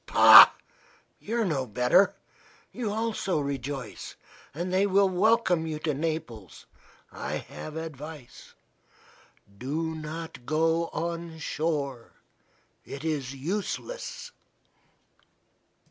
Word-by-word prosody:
Pah! - - +10 0.7
you 230 +3 -3
are - - +1
no 140 -8 -1
better. 125 - +3 0.6
You 230 -4 -4
also 215 -5 -1
rejoice 140 -3 -5 0.4
and 175 +5 -4
they 195 +2 +3
will 200 0 +4
welcome 185 -3 +2
you 155 -1 -3
to 155 0 -2
Naples. 140 - -5 0.5
I - - -6
have 155 - -8
advice. 155 -4 -9 1.0
Do 160 +5 -3
not 160 -3 -7
go 165 +2 +1
on 170 0 -5
shore. 145 -6 -3 0.7
It 140 +2 -9
is 140 -4 -3
useless." 210 - -5
160 Hz, 100 wpm, -27 LUFS, 140-185 Hz, 1.0 s, Pah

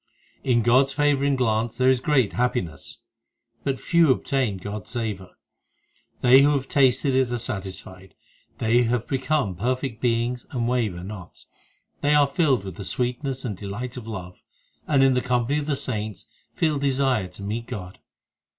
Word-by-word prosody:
In 120 -3 +2
God 125 +4 +5
s 135 - -6
favouring 140 -1 +2
glance 115 -2 0
there 130 0 +2
is 130 - +2
great 130 -8 +2
happiness. 95 - -2 0.6
But 135 -1 -1
few 170 -3 +3
obtain 130 -5 0
God 100 +2 -6
s - - -14
savour; 105 -6 -5 0.4
* - - -41
They 130 +2 +8
who 145 +1 +4
have 135 -1 -2
tasted 135 0 +3
it 130 -2 +2
are 120 - 0
satisfied, 95 -3 -6 0.4
They 115 +2 +3
have 120 0 0
become 135 -5 0
perfect 125 +3 -2
beings 120 0 0
and 120 -3 -2
waver 110 -8 -1
not, 95 -2 -10 0.6
They 145 +1 +3
are 145 -1 +6
filled 140 - +1
with 95 -3 -7
the 100 - -6
sweetness 125 +5 -2
and 110 -5 -3
delight 105 +6 -6
of 120 -3 -8
love, 90 -5 -7 0.5
And 140 -3 +4
in 135 -1 +5
the 125 - +1
company 125 +4 0
of 145 - -5
the 145 - +1
saints 110 -6 -5 0.3
feel 155 -4 +1
desire 135 -6 +1
to 90 +2 -11
meet 115 +4 -4
God. 90 -2 -7
125 Hz, 170 wpm, -24 LUFS, 105-135 Hz, 0.6 s, They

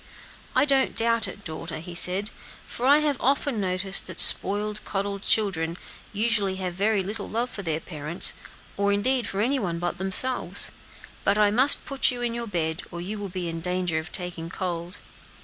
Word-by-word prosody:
"I - - +4
don't 275 -2 +1
doubt 230 -1 +1
it, 200 +2 -10
daughter," 165 0 -6
he 170 +3 -9
said, 185 +4 +4 0.3
"for 245 - -4
I 290 +2 +5
have 295 -3 0
often 270 -3 0
noticed 190 +1 +1
that - - -6
spoiled, 210 +1 +3
petted 200 0 -4
children, 175 -7 +1 0.3
usually 210 -2 0
have 185 -2 -4
very 200 +2 0
little 205 +2 -6
love 235 +3 -3
for 200 - -6
their 160 -4 -2
parents, 155 0 +3 0.4
or 200 0 +1
indeed 240 +4 0
for 195 - -3
any 265 +5 +1
one 175 -7 -3
but 175 +1 -4
themselves. 195 +7 +5 0.5
But 200 +1 +1
I 210 -1 +3
must 260 +6 +3
put 275 -2 +1
you 245 -1 -4
in 235 -1 -2
your 235 0 -5
bed, 160 -5 -2
or 170 - -8
you 200 +5 -6
will 200 -1 -6
be 180 -1 -5
in 165 0 -5
danger 180 -1 -2
of 160 - -9
taking 175 -2 -5
cold." 175 0 -5
200 Hz, 185 wpm, -24 LUFS, 175-230 Hz, 0.5 s, I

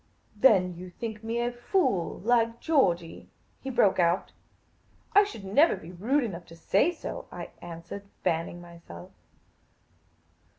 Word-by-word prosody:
" - - -40
Then 200 -6 +4
you 180 +2 -9
think 220 +3 -6
me 230 +1 -2
a 240 0 0
fool, 240 - 0
like 230 +1 +2
Georgey? 175 - +1 0.2
" - - -39
he 270 - -5
broke 205 -7 +3
out. 175 +2 +2 0.4
" - - -35
I 410 - +9
should 400 - -7
never 285 - +4
be 165 - -11
rude 240 +11 +1
enough 180 -7 -6
to 165 - -12
say 195 - +2
so," 350 - -7
I - - -7
answered, 175 +4 -8 0.2
fanning 165 +1 -1
myself. 175 +1 -12
200 Hz, 155 wpm, -28 LUFS, 175-240 Hz, 0.4 s, I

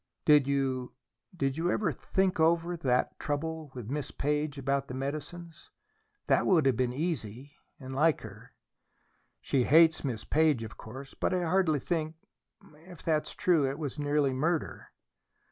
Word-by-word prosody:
"Did 150 -3 +6
you 135 -2 -1 0.4
did 135 -2 -1
you 175 +2 +1
ever 185 -2 +1
think 190 +6 -1
over 170 +2 +2
that 130 -6 0
trouble 160 +1 -3
with 120 -1 -7
Miss 150 0 -3
Page 150 0 -2
about 140 0 -1
the 125 - -6
medicines? 155 +5 -6 0.6
That - - +2
would 165 -6 +4
have 135 -2 +3
been 125 +1 0
easy, 135 - -4 0.3
and 130 -1 -8
like 150 +3 +2
her." 110 +2 -12 0.9
"She 130 -3 +1
hates 160 +2 +5
Miss 120 -6 -3
Page, 155 -6 +2
of 110 - -8
course, 135 +5 -10
but 185 - -1
I 180 - 0
hardly 175 -3 +2
think 160 +1 -2 0.7
If 175 -4 -12
that's 155 -2 -1
true, 165 -8 +2
it 135 - -4
was 150 -2 -5
nearly 145 -2 +1
murder." 160 +5 -1
145 Hz, 155 wpm, -29 LUFS, 135-160 Hz, 0.9 s, Did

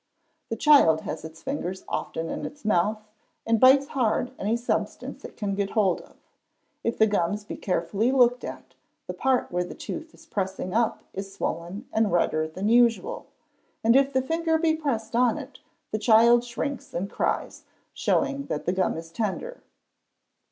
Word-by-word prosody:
The - - -1
child 220 - +5
has 155 0 -5
its 160 0 -10
fingers 190 -9 -4
often 165 0 -3
in - - -4
its 290 -5 -8
mouth, 215 +2 +1 0.4
and 225 0 +2
bites 270 +3 +6
hard 250 -1 0
any 215 +4 0
substance 235 - -3
it - - -10
can 205 -3 -2
get 200 0 -2
hold 195 -5 +3
of. - - -19 0.7
If 230 - -1
the 220 - +6
gums 205 0 0
be - - -6
carefully 195 +6 0
looked 245 -1 +4
at, - - -8 0.3
the - - -5
part 265 -1 +1
where 180 0 0
the 175 - -8
tooth 320 +1 -6
is 325 - -18
pressing 190 - -3
up 230 0 +1
is 195 0 -6
swollen 185 +5 -4
and 220 -2 +2
redder 155 -2 +1
than 185 +6 -4
usual; 240 - +2 0.6
and 230 +2 +5
if 275 0 +4
the 260 -1 +1
finger 325 +3 +1
be 320 -1 +2
pressed 235 -8 -2
on 245 +1 +3
it 275 -3 -9 0.3
the 215 - -1
child 230 +2 +6
shrinks 260 +3 -5
and 180 +3 -1
cries, - - -2 0.3
showing 280 0 0
that 150 - -3
the 180 - +1
gum 185 -3 0
is 165 0 -8
tender. 235 - -3
225 Hz, 175 wpm, -26 LUFS, 190-265 Hz, 0.7 s, bites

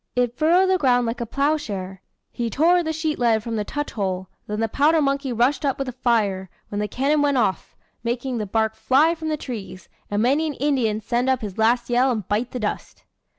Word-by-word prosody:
It 245 -1 +1
furrowed 335 +6 +4
the 375 - +2
ground 245 -4 +3
like 235 +1 -3
a 235 - -3
ploughshare. 215 -10 -2 0.3
He 235 -1 -3
tore 340 +9 +3
the 320 -2 -2
sheet 315 -1 -2
lead 225 -3 +2
from 230 0 -3
the 210 - -1
touch 290 +7 -4
hole; 190 -3 -3 0.2
then 210 0 -3
the 225 - +1
powder 300 +8 +3
monkey 275 -2 0
rushed 245 +6 +1
up 275 -2 0
with 275 - -2
the 255 - -4
fire, 215 -7 0 0.2
when 205 - -3
the 210 - -1
cannon 280 +7 +1
went 285 -2 +2
off, 210 -6 -1 0.3
making 240 +1 -2
the 210 - -3
bark 220 +2 0
fly 300 +6 +3
from 320 -1 -5
the 305 - -1
trees, 210 - -8 0.2
and 205 +1 0
many 285 +6 +2
an 295 - -4
Indian 245 -7 0
send 240 +4 0
up 260 -1 +1
his 205 -2 -6
last 235 +2 +2
yell 250 +2 +3
and 220 -7 -2
bite 220 +4 0
the 250 - -5
dust." 210 -2 -4
245 Hz, 225 wpm, -23 LUFS, 220-285 Hz, 0.3 s, furrowed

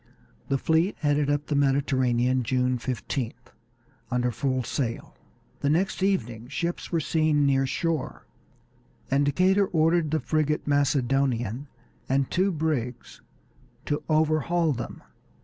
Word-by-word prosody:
The 135 - +1
fleet 160 +7 +1
headed 145 -1 +2
up 145 0 0
the 150 - -3
Mediterranean 130 -3 +2
June 125 +1 0
15th, 125 0 -4 0.6
under 125 0 0
full 130 +1 -1
sail. 115 0 -3 0.4
The 140 - 0
next 180 +5 +1
evening 120 - -1
ships 170 +6 -3
were 170 - +1
seen 155 -1 +2
near 135 -1 +2
shore, 165 +1 -2 0.9
and 140 +1 +3
Decatur 190 +7 +3
ordered 165 -1 +2
the 155 +1 +1
frigate 150 +2 0
Macedonian 135 -3 +1 0.4
and 135 0 +1
two 190 +2 +2
brigs 150 -7 -3 0.6
to 145 - -1
overhaul 155 +1 +2
them. 120 - -7
145 Hz, 120 wpm, -26 LUFS, 130-155 Hz, 0.9 s, and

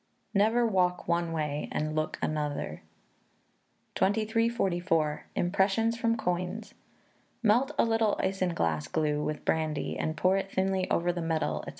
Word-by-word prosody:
[NEVER 220 +4 +3
WALK 180 -4 +1
ONE 170 0 +1
WAY 150 -2 -2
AND 155 0 -2
LOOK 155 0 -1
ANOTHER.] 150 - -2 1.1
2344. 195 -7 +1
Impressions 200 +5 +2
from 230 -1 +1
Coins. 180 +3 -3 0.7
Melt 240 +6 +3
a - - +4
little 225 -2 +1
isinglass 170 - 0
glue 150 -1 0
with 150 0 -4
brandy, 155 -2 -1
and 155 0 -2
pour 185 +4 +3
it 195 0 -3
thinly 190 0 0
over 175 +1 +1
the 175 - -3
medal, 160 -2 -1
&c. - - -3
180 Hz, 130 wpm, -29 LUFS, 155-210 Hz, 1.1 s, a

